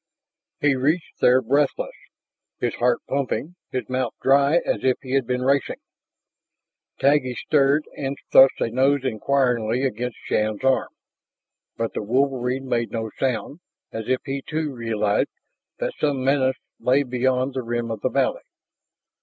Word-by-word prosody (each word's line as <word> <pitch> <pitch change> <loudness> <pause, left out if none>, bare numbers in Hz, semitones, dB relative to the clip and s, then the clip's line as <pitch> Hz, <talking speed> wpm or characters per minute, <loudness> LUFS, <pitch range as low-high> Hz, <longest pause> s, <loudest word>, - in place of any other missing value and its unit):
He 145 -1 +4
reached 150 +6 -1
there 130 +1 +4
breathless, 140 +4 +1 0.7
his 120 - -1
heart 120 0 +1
pumping, 140 +4 -2 0.2
his 130 - -3
mouth 130 -2 -2
dry 140 +3 +4
as - - -1
if 130 -1 +2
he 130 - -7
had 135 -3 +1
been 125 0 -1
racing. 140 +1 +1 1.2
Taggi 135 -3 +2
stirred 145 +3 +2
and 140 0 -3
thrust 135 0 +7
a 115 - 0
nose 135 +3 +2
inquiringly 125 -1 +1
against 125 -2 -2
Shann's 105 +1 -1
arm. 135 0 +2 0.9
But 115 0 -2
the - - -3
wolverine 130 +2 0
made 120 -2 0
no 110 -2 -4
sound, 135 +4 -2 0.3
as 110 +1 -6
if 130 0 +1
he, 135 -1 -3
too, 155 0 -3
realized 110 -4 0 0.5
that - - -2
some 140 -4 0
menace 130 -1 +2 0.2
lay 135 +3 +3
beyond 130 +1 0
the 130 - -2
rim 120 -1 -3
of 110 - -5
the - - +1
valley. - - 0
130 Hz, 145 wpm, -23 LUFS, 120-140 Hz, 1.2 s, thrust